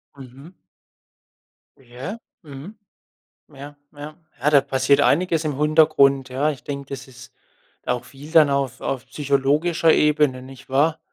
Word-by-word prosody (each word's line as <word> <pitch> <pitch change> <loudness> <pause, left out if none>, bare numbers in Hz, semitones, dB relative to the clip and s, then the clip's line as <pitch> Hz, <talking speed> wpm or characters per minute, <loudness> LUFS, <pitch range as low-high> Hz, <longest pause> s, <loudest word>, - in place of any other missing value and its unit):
Mhm. 135 +6 -14 1.2
Ja, 130 - -8 0.2
mhm. 155 +6 -11 0.8
Ja, 145 +2 -11 0.2
ja. 150 +1 -9 0.3
Ja, 145 - +2
da 145 -2 +5
passiert 135 0 +1
einiges 165 +1 +1
im 150 - -2
Hintergrund, 150 -3 +3
ja. 140 +4 -1
Ich 135 - -11
denke, 140 -1 -7
das 135 -1 -8
ist 125 -1 -15 0.5
auch 125 -1 -2
viel 145 +3 -13
dann 155 -4 +5
auf 140 -3 -2
auf 130 - -4
psychologischer 150 +4 +1
Ebene, 150 -4 +1
nicht 135 +1 -14
wahr? 150 +4 +1
140 Hz, 135 wpm, -21 LUFS, 135-155 Hz, 1.2 s, da